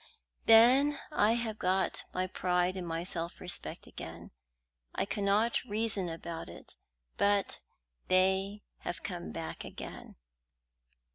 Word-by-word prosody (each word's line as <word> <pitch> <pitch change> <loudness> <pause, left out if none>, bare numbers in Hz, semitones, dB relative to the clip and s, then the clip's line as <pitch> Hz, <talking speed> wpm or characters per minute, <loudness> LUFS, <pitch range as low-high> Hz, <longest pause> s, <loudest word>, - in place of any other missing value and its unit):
"Then 255 +6 +7
I 215 -5 +4
have 230 -2 -2
got 190 +1 +2
back - - -1
my 185 0 +1
pride 180 0 0
and 180 -2 -4
my 165 0 -2
self 170 -1 -4
respect 180 - -2
again. 85 +1 -9 0.6
I - - 0
cannot 205 +3 +1
reason 210 -5 0
about 165 - -6
it, 85 - -11 0.4
but 200 -1 +2 0.5
they 190 +2 +2 0.2
have 175 - -5
come 175 -3 -5
back 165 -1 -5
again." - - -9
190 Hz, 125 wpm, -32 LUFS, 175-210 Hz, 0.6 s, Then